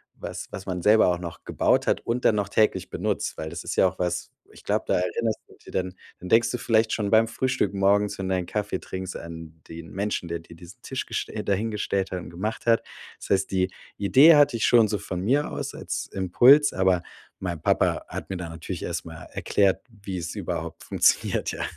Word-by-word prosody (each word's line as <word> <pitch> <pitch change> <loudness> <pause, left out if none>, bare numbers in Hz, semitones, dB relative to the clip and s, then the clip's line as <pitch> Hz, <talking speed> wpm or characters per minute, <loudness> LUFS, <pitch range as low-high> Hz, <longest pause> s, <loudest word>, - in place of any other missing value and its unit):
was - - -7
was 95 - -7
man 90 -2 -3
selber 110 +3 +5
auch 90 -1 +1
noch 85 -3 -8
gebaut - - +1
hat - - +2
und 120 +2 -1
dann 110 - +5
noch 100 -1 -1
täglich 110 +1 +1
benutzt, - - -2
weil 80 - -4
das 85 -2 -7
ist - - -4
ja - - +6
auch 95 - -6
was 90 0 -2 0.2
Ich - - -15
glaub, - - 0
da - - 0
erinnerst 90 +5 -1
du - - -17
dich - - -14
dann 95 -1 -1 0.3
dann 90 - -8
denkst 115 +1 +4
du - - -2
vielleicht 110 -2 +2
schon 105 -2 -1
beim 110 +1 +5
Frühstück 125 -1 -1
morgens, 100 +1 +2
wenn 95 -1 -3
du 95 - +2
deinen 90 - -2
Kaffee 105 -3 -2
trinkst 95 0 -6
an 80 -1 -10
den 80 -1 -9
Menschen, 100 -2 -2
der 85 - -3
dir 85 0 -14
diesen 90 +8 -14
Tisch 130 - -4
gestell 105 - -4
dahingestellt 100 -1 -1
hat 90 - -2
und 80 -3 -9
gemacht 105 +6 -4
hat. 115 -1 +4 0.4
Das - - -10
heißt, 95 -1 +2
die 95 -1 +1 0.3
Idee 135 +11 +7
hatte 145 -4 +5
ich 110 - +1
schon 115 -3 +5
so 105 - -1
von 90 - -5
mir 135 +9 +1
aus - - -4
als - - -4
Impuls, 125 +11 +5
aber 95 -2 +2 0.4
mein 85 -4 -4
Papa - - +1
hat - - -7
mir 95 - -3
da 90 - -5
natürlich 85 +2 -6
erst 85 -1 -3
mal 80 -1 -9
erklärt, 100 -2 +1 0.2
wie 95 -2 -5
es 85 -1 -4
überhaupt - - -5
funktioniert, - - +2
ja. - - -4
95 Hz, 220 wpm, -25 LUFS, 90-110 Hz, 0.4 s, Idee